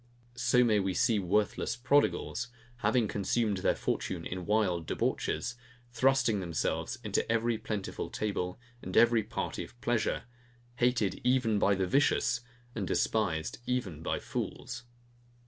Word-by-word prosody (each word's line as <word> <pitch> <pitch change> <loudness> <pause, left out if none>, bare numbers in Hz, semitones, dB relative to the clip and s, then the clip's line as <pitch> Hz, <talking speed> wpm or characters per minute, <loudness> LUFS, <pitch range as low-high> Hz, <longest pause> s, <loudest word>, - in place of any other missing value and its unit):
So 125 0 +3
may 110 -3 +4
we 95 -2 -1
see 110 +4 +3
worthless 100 +5 0
prodigals, 135 +4 +1 0.3
having 120 -2 +2
consumed 105 +1 0
their 90 - +2
fortune - - -2
in 90 0 -5
wild 95 -6 +1
debauches, 120 - -1 0.3
thrusting 125 -3 +3
themselves 80 +3 -2
into 105 +1 0
every 115 0 +1
plentiful 105 -3 -4
table, 95 -3 -2 0.2
and - - -3
every 120 -1 +6
party 105 - -4
of 120 - -14
pleasure, 120 -2 0 0.5
hated 120 -6 +1
even 125 -4 +3
by 100 0 +4
the 95 0 0
vicious, 125 +1 +2 0.3
and 100 -6 -3
despised 90 -6 0
even 105 -11 -2
by - - -1
fools. 125 - -5
110 Hz, 130 wpm, -31 LUFS, 95-120 Hz, 0.5 s, every